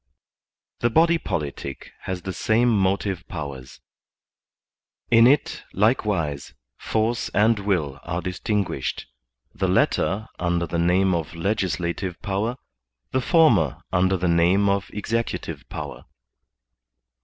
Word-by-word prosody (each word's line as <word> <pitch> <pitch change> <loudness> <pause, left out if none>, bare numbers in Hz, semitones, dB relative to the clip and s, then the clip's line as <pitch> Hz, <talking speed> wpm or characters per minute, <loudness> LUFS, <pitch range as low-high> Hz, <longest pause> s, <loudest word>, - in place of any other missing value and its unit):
The 120 - +2
body 165 +7 +4
politic 70 - -5
has 90 -2 -4
the 95 - -4
same 115 +6 +2
motive 95 -1 0
powers; 70 -6 -7 1.3
in 115 0 +7
it, 140 +2 +2
likewise, 95 - 0 0.2
force 110 - -1
and 110 +1 +4
will 85 -9 -1
are 85 +1 -3
distinguished, 95 +3 -2 0.5
the - - -1
latter 105 +3 +1
under 85 -1 0
the 85 0 -2
name 90 +2 +3
of 85 -1 -3
legislative 90 -1 -2
power, 105 +5 -1 0.5
the 130 - +1
former 150 - +3
under 95 +1 +3
the 90 0 -1
name 85 +4 +3
of 100 0 0
EXECUTIVE 115 +2 -3
POWER. - - -7
95 Hz, 110 wpm, -24 LUFS, 85-110 Hz, 1.3 s, in